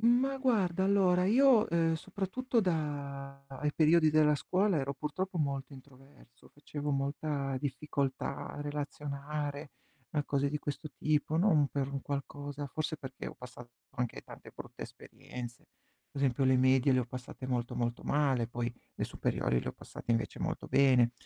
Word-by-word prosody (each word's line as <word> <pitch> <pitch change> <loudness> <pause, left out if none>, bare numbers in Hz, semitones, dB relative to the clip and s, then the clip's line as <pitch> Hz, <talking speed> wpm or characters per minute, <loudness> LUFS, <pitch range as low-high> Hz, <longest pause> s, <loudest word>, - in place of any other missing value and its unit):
Ma 245 +4 +4
guarda, 200 -9 +2
allora, 190 -2 +4
io, 245 +1 +6
uhm, 165 -1 +3
soprattutto 200 +8 -1
da 140 -6 -3 0.2
i 150 0 +1
periodi 155 0 +5
della 150 -1 +5
scuola 185 +4 +1
ero 140 0 -2
purtroppo 175 +6 -3
molto 140 -2 -2
introverso, 130 -2 -17
facevo 145 0 -5
molta 140 0 -1
difficoltà 140 -1 -2
a - - -7
relazionare, 145 0 -4 0.4
a 145 -1 +1
cose 140 0 +1
di 150 - -1
questo 145 +1 -4
tipo, 155 +1 +1
non 160 -6 +4
per 140 -1 -1
un 140 0 -3
qualcosa, 145 0 -4
forse 155 +3 -3
perché 130 -2 -7
ho - - -10
passato 125 -1 -11 0.2
anche 125 -3 -3
tante - - -12
brutte - - -9
esperienze. 120 -1 -9 0.4
Pe' - - -7
esempio 135 -1 +2
le 130 0 +5
medie 130 +1 +4
le 130 - +4
ho - - -1
passate 125 +1 -7
molto, 125 -2 -1
molto 120 0 -1
male, 135 -6 +2
poi 120 0 -3 0.2
le - - -2
superiori - - 0
le - - -5
ho - - -2
passate - - -8
invece 115 -1 0
molto - - -2
bene. 130 -3 +5
145 Hz, 160 wpm, -32 LUFS, 135-160 Hz, 0.4 s, io